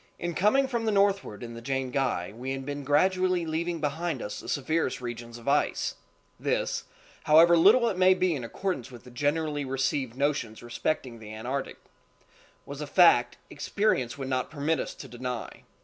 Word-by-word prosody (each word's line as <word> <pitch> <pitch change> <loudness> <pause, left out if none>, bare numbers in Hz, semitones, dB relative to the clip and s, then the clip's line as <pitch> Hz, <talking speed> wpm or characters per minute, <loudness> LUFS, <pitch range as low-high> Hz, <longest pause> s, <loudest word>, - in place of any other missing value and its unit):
In 175 0 -3
coming 215 +10 +3
from 235 -3 -2
the 220 - +2
northward 195 - +1
in 115 0 -7
the 115 - -8
Jane 130 0 -2
Guy 125 -9 -1
we 130 +3 -4
had 135 0 -5
been 145 0 -4
gradually 185 +4 +2
leaving 165 +1 -2
behind 160 +3 -2
us 105 - -5
the - - -9
severest 155 0 0
regions 120 -1 -7
of 120 - -14
ice—this, 145 +1 -2 0.4
however 165 +2 +7
little 215 +9 +6
it 190 -5 -2
maybe 185 -1 +4
in 130 - -5
accordance 155 +2 -3
with 120 -3 -12
the 125 - -13
generally 145 +2 -1
received 135 -2 -1
notions 140 -6 -1
respecting 120 0 -3
the 110 -1 -10
Antarctic, 125 +5 -4 0.9
was 140 +1 -7
a 150 - -4
fact—experience 140 - +2
would 135 -1 -5
not 130 -1 -1
permit 155 +1 -1
us - - -4
to 135 - -9
deny. 125 0 -6
145 Hz, 165 wpm, -28 LUFS, 125-170 Hz, 0.9 s, however